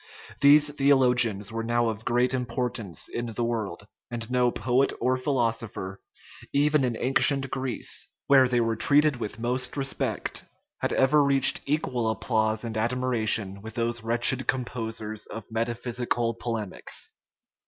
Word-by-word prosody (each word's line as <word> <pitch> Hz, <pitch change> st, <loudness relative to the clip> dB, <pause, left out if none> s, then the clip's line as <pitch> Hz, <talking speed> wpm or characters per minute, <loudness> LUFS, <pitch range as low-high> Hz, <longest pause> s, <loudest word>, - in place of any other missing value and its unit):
These 145 Hz, +1 st, +6 dB
theologians 125 Hz, -7 st, +3 dB
were 115 Hz, 0 st, -3 dB
now 120 Hz, 0 st, +1 dB
of 110 Hz, -1 st, -5 dB
great 125 Hz, +2 st, +1 dB
importance 120 Hz, -6 st, -3 dB
in 120 Hz, 0 st, -4 dB
the 115 Hz, +1 st, -3 dB
world; 110 Hz, -5 st, -3 dB, 0.2 s
and 115 Hz, -1 st, -6 dB
no 125 Hz, -1 st, +3 dB
poet 130 Hz, +2 st, +1 dB
or 130 Hz, 0 st, +1 dB
philosopher, 115 Hz, -7 st, -2 dB, 0.5 s
even 145 Hz, 0 st, +2 dB
in 120 Hz, -3 st, -1 dB
ancient 135 Hz, +1 st, +2 dB
Greece, 130 Hz, -3 st, -4 dB, 0.2 s
where 135 Hz, -2 st, +6 dB
they 125 Hz, -1 st, +1 dB
were 115 Hz, -1 st, +1 dB
treated 145 Hz, +3 st, +3 dB
with 110 Hz, -2 st, -5 dB
most 125 Hz, +4 st, -1 dB
respect, 135 Hz, -1 st, -2 dB, 0.4 s
had -, -, -1 dB
ever 145 Hz, +3 st, +4 dB
reached 140 Hz, -1 st, +5 dB
equal 125 Hz, -6 st, 0 dB
applause 110 Hz, -1 st, 0 dB
and 115 Hz, -2 st, -4 dB
admiration 110 Hz, -4 st, 0 dB
with 110 Hz, +1 st, -9 dB
those 120 Hz, 0 st, -1 dB
wretched 120 Hz, +2 st, +1 dB
composers 110 Hz, -4 st, -3 dB
of 115 Hz, 0 st, -9 dB
metaphysical 120 Hz, +1 st, -2 dB
polemics. 115 Hz, -4 st, -4 dB
120 Hz, 135 wpm, -26 LUFS, 115-130 Hz, 0.5 s, These